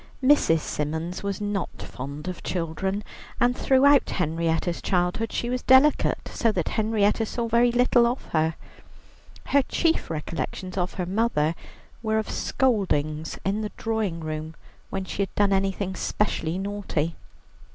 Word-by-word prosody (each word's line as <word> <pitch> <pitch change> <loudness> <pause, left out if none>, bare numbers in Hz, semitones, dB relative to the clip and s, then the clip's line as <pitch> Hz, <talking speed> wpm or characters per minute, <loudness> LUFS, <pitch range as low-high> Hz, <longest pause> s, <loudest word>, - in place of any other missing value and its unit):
Mrs. 255 - +4
Symons 160 +5 -3
was 200 -1 -3
not 205 -3 -3
fond 140 +5 -7
of 185 - -5
children, 190 +4 -2 0.4
and 245 +1 +3
throughout 275 +2 +4
Henrietta's 165 0 -1
childhood 180 +4 0
she 240 - -2
was 250 +1 -1
delicate, 265 +3 +4
so 230 - +1
that 175 -5 -1
Henrietta 215 0 +1
saw 230 +1 -2
very 235 +1 +4
little 240 0 +4
of 245 +3 -3
her. 160 0 +2 0.9
Her 280 - +3
chief 330 +5 0
recollections 165 +3 -4
of 180 -1 -2
her 180 - -2
mother 185 -5 +1 0.5
were 220 -1 0
of 220 - -2
scoldings 160 - 0
in 200 +3 0
the 210 - -4
drawing 220 -7 -1
room 155 0 -5 0.3
when 195 -1 -3
she 190 - -3
had 195 - -3
done 200 -1 +3
anything 195 0 0
specially 180 -4 -1
naughty. 190 -5 -2
195 Hz, 140 wpm, -25 LUFS, 165-225 Hz, 0.9 s, Mrs